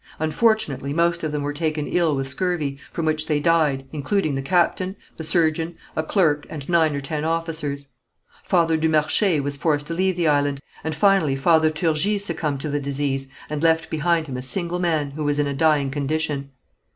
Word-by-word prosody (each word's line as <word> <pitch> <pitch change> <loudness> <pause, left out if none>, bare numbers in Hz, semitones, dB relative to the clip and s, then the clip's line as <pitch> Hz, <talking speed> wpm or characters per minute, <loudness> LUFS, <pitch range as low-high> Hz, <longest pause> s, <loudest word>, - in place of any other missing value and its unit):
Unfortunately, 155 - +1
most 170 +1 +1
of 155 - -1
them 150 -1 -2
were 145 0 -2
taken 155 -1 -1
ill 165 -3 +1
with 135 0 -2
scurvy, 150 -3 -2
from 165 - -3
which 155 0 0
they 150 -2 +1
died, 150 -4 +2
including 155 +2 0
the 135 - -1
captain, 185 +4 +1 0.2
the 160 - -5
surgeon, 160 +1 +1 0.2
a - - +1
clerk 155 -3 +1
and 145 -3 -6
nine 160 -4 +3
or 140 - -3
ten 150 +2 -3
officers. 160 -4 -2 0.5
Father 165 -3 +2
du 160 0 +1
Marché 155 +3 +2
was 140 0 -2
forced 145 -1 0
to 165 - -4
leave 185 +2 +1
the 170 -2 +1
island, 145 -1 +2 0.2
and 160 0 -2
finally 195 -7 +3
Father 160 +3 +4
Turgis 165 +6 0
succumbed 155 -5 -2
to 155 - -3
the 145 0 -1
disease, 140 -1 -2 0.2
and 150 -1 -4
left 160 0 +2
behind 165 +1 +1
him 130 -4 -5
a - - -4
single 175 +6 -3
man, 160 -5 0
who 150 +2 -5
was 145 0 +1
in 145 - +2
a 140 - -2
dying 145 -2 +2
condition. 145 0 -2
155 Hz, 195 wpm, -23 LUFS, 145-170 Hz, 0.5 s, Father